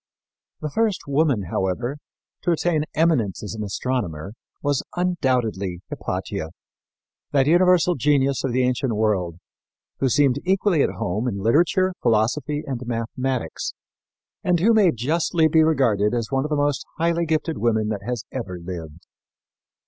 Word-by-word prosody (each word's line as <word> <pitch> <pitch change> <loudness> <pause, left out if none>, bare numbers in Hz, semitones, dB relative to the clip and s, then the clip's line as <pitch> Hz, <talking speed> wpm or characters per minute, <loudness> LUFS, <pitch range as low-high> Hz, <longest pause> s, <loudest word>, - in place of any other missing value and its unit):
The 150 - -3
first 215 0 +1
woman, 140 -6 +2
however, 120 +9 -1 0.4
to 175 - +1
attain 160 -2 +1
eminence 150 - +1
as 105 - -5
an 110 -1 -4
astronomer 100 -5 -3 0.3
was 145 -2 +1
undoubtedly 125 - 0
Hypatia, 80 - -4 0.8
that 135 -2 +4
universal 180 +2 +4
genius 140 -1 +1
of 135 - 0
the 130 +1 +2
ancient 125 0 0
world, 100 -6 0 0.6
who 135 - +2
seemed 140 0 +3
equally 185 -3 +2
at - - +3
home 105 +8 -2
in 105 -5 -2
literature, 170 - +2
philosophy 125 +7 +1
and 130 -3 -4
mathematics, 125 +2 -3 0.7
and 180 -2 +2
who 220 +7 +4
may 205 -6 +5
justly 160 +6 +1
be 160 +1 +4
regarded 120 -9 +2
as 115 0 -2
one 135 +1 +1
of - - -3
the 150 - 0
most 145 -2 0
highly 170 +1 +1
gifted 160 +1 -1
women 110 -2 +1
that 105 -2 -3
has 120 -2 -3
ever 100 -9 -5
lived. 85 -2 -8
130 Hz, 145 wpm, -23 LUFS, 110-160 Hz, 0.8 s, may